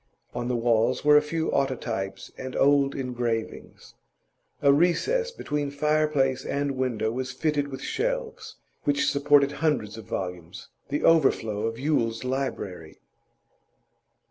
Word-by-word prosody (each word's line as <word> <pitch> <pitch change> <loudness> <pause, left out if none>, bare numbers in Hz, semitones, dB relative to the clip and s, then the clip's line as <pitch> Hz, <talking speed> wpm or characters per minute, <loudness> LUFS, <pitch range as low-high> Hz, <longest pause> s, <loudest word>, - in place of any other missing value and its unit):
On 120 0 -3
the 125 - 0
walls 115 +2 +1
were 150 0 +7
a 150 - +7
few 160 +2 -2
autotypes 115 -8 -2
and 130 0 -7
old 140 0 +3
engravings. 120 -4 -4 0.7
A 140 -1 +6
recess 180 - +2
between 150 - -3
fireplace 150 -2 +1
and 140 0 -1
window 125 -5 -1
was 130 +2 -3
fitted 145 +1 -1
with 135 -2 -7
shelves, - - -3 0.3
which 145 -1 +1
supported 140 0 +4
hundreds 140 -8 -1
of 110 - -11
volumes, 90 -1 -6 0.2
the 145 +1 -2
overflow 115 -9 +3
of 115 0 -4
Yule's 115 -5 0
library. 125 -11 -4
135 Hz, 125 wpm, -26 LUFS, 115-150 Hz, 0.7 s, were